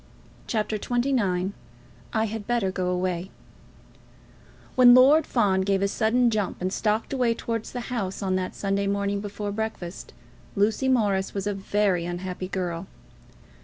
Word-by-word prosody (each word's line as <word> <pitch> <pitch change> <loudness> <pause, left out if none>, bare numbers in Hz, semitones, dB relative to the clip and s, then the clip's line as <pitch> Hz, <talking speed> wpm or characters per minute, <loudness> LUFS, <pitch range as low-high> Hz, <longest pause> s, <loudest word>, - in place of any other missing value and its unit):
CHAPTER 215 -1 -1
XXIX 220 -7 0 0.6
"I 220 0 +1
Had 220 -1 -5
Better 235 -6 +1
Go 185 -1 -2
Away" 180 0 -1 1.4
When 245 -1 +8
Lord 280 +5 +6
Fawn 200 -6 +2
gave 195 0 +1
a - - +3
sudden 230 +4 +2
jump 210 -3 -1
and 185 +1 -2
stalked 215 +4 0
away 245 -3 +2
towards 230 -1 -4
the 245 - -4
house 200 -4 -3
on 190 -1 0
that 185 0 -2
Sunday 200 0 -1
morning 200 0 0
before 205 0 -4
breakfast, 205 -4 -5 0.4
Lucy 220 +6 +1
Morris 205 -7 +1
was 195 -1 -2
a 205 - 0
very 195 -2 0
unhappy 180 +1 -4
girl. 180 -1 -3
200 Hz, 145 wpm, -25 LUFS, 190-225 Hz, 1.4 s, When